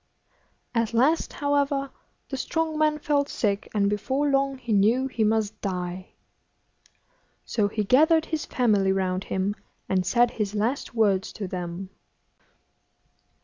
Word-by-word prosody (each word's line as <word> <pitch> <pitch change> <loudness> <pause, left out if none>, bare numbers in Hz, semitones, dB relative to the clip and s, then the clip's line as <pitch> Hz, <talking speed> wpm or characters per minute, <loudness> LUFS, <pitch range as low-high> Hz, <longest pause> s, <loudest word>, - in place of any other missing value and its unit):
At 230 -1 0
last, 285 +8 +2
however, 285 -1 0 0.4
the 270 - -3
strong 315 +4 -2
man 305 -1 +3
felt 285 -1 0
sick, 205 -2 -1
and 200 -2 +1
before 260 +8 0
long 275 0 +1
he 235 -3 -3
knew 220 +6 +3
he 245 -4 -1
must 215 0 0
die. 180 -1 -4 1.3
So 210 -3 +1
he 210 +1 -2
gathered 315 - +4
his 315 -2 -3
family 205 -6 +2
round 185 0 -1
him, 190 +2 -1 0.3
and 185 -1 +1
said 240 +6 +3
his 210 -1 -3
last 235 +4 -1
words 200 -4 +2
to 200 - -5
them. 180 +1 -5
225 Hz, 135 wpm, -25 LUFS, 195-275 Hz, 1.3 s, gathered